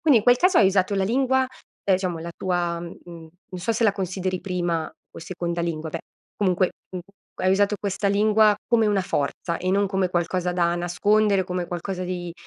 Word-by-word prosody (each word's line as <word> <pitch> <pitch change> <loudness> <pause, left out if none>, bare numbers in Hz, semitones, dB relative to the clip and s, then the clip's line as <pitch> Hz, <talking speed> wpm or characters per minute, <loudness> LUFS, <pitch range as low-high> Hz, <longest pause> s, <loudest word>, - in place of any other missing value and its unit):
Quindi 290 -7 +5
in - - -3
quel 245 0 +6
caso 365 +5 +4
hai - - +6
usato 190 +1 +2
la 195 -1 +1
lingua, 265 +4 +2 0.4
ehm, 195 - +4
diciamo, 180 -3 -2
la 170 +1 -6
tua 175 -2 -1
mhmm, 170 0 -8 0.6
non 180 -1 -7
so 225 +6 0
se 230 +1 0
la 205 - +4
consideri 185 -1 -3
prima 175 -4 -2 0.2
o - - -11
seconda 170 0 -4
lingua, 160 -2 -3
beh, 165 - -4 0.4
comunque, 185 -2 +1 0.2
u 185 - -5 0.4
hai 185 0 +3
usato 205 +1 +2
questa 200 0 -1
lingua 215 +1 +4
come 225 -2 +3
una 205 -2 +2
forza 170 0 -2
e 185 +1 -1
non 200 +1 +2
come 190 -1 0
qualcosa 180 +1 -1
da 175 -1 +1
nascondere, 195 +3 +2
come 180 -1 -3
qualcosa 180 +1 -4
di 180 -1 -4
185 Hz, 195 wpm, -24 LUFS, 175-205 Hz, 0.6 s, quel